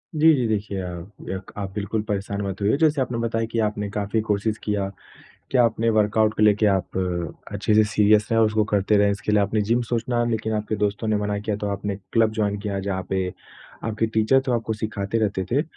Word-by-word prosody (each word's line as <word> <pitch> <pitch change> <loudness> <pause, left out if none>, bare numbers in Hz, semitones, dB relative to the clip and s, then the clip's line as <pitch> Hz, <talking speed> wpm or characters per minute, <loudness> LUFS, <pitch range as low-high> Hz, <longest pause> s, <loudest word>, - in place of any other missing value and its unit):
जी, 160 +1 +6
जी। 125 -3 0
देखिए 105 -2 -2
आप 90 0 -7 0.2
यक 95 0 -5
आप 100 -2 -4
बिल्कुल 105 +1 -2
परेशान 100 -1 -3
मत 100 0 -4
होइए, 105 +7 +2
जैसे 150 -2 +3
आपने 125 -2 -2
बताया 115 -1 -1
कि 115 - -1
आपने 105 -1 -3
काफ़ी 105 +2 -1
कोशिश 105 +1 -1
किया। 100 -2 -1 0.6
क्या 125 -2 +5
आपने 115 0 +1
वर्कआउट 110 +1 +3
को 105 - +3
लेके 105 0 +4
आप 95 -2 +1 0.5
अच्छे 105 +1 0
से 110 - +6
सीरियस 105 0 +4
रहें 115 - +3
और 110 - +6
उसको 110 0 +1
करते 105 +1 +3
रहें, 100 0 +4
इसके 100 +1 -2
लिए 105 - +4
आपने 105 +2 +1
जिम 115 +4 +1
सोचना 120 0 0
लेकिन 110 -1 -1
आपके 105 0 -1
दोस्तों 105 +2 -1
ने 110 - +2
मना 105 0 -1
किया 105 0 -2
तो 105 - -3
आपने 100 0 -3 0.2
क्लब 110 -1 +4
जॉइन 100 -1 +1
किया 100 -1 -3
जहाँ 95 -1 -2
पे 95 -1 0 0.6
आपके 115 0 0
टीचर 110 +4 +3
तो 125 - +1
आपको 115 -1 -1
सिखाते 105 0 -3
रहते 100 -2 -2
थे 140 +5 +2
105 Hz, 215 wpm, -23 LUFS, 100-110 Hz, 0.6 s, जी